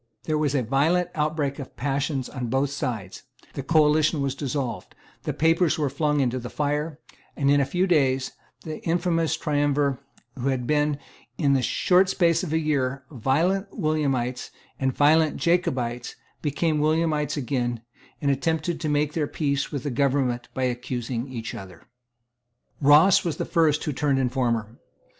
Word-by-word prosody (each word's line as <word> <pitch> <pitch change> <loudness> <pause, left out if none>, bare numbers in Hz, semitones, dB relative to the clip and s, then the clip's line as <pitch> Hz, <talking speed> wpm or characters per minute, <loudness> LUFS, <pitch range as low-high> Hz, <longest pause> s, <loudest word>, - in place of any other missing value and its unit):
There 155 - -1
was 145 -2 0
a 130 - +1
violent 160 +9 +2
outbreak 150 -2 -1
of 135 - -9
passion 135 +1 -1
on 125 -3 -3
both 135 +3 0
sides; 115 -9 -4 0.3
the - - -4
coalition 155 +1 +3
was 135 -1 -1
dissolved; 135 -4 -4 0.3
the - - 0
papers 165 +2 +2
were 145 -4 0
flung 150 0 +1
into 130 -1 0
the 120 0 -7
fire; 150 +1 -2 0.4
and, 140 -1 +2
in 145 0 +4
a - - +2
few 180 +6 +1
days, 135 -7 +2 0.3
the 155 -1 -6
infamous 165 -1 0
triumvirs 145 -2 +1 0.4
who 130 0 -3
had 130 -2 0
been, 150 +1 +1 0.4
in 140 -4 +2
the 135 - +3
short 185 +8 +3
space 170 -4 +2
of 180 - -4
a 160 - +2
year, 135 -4 -1
violent 160 - 0
Williamites 135 -6 -1 0.3
and 130 -1 +1
violent 155 +3 +3
Jacobites, 125 -9 0 0.3
became 155 +1 0
Williamites 155 0 +1
again, 120 -4 -2 0.4
and 140 - +2
attempted 160 +3 -1
to 155 - -1
make 150 0 +1
their 155 -3 0
peace 140 -2 -1
with 140 - -4
the 145 - -2
government 130 -2 0
by 130 - -1
accusing 125 0 -3
each 115 -3 -6
other, 95 -7 -10 1.0
Ross 150 +7 +6
was 170 -3 -2
the - - -2
first 155 -3 +2
who 150 - -2
turned 140 0 +1
informer. 120 -4 -1
145 Hz, 160 wpm, -25 LUFS, 130-155 Hz, 1.0 s, Ross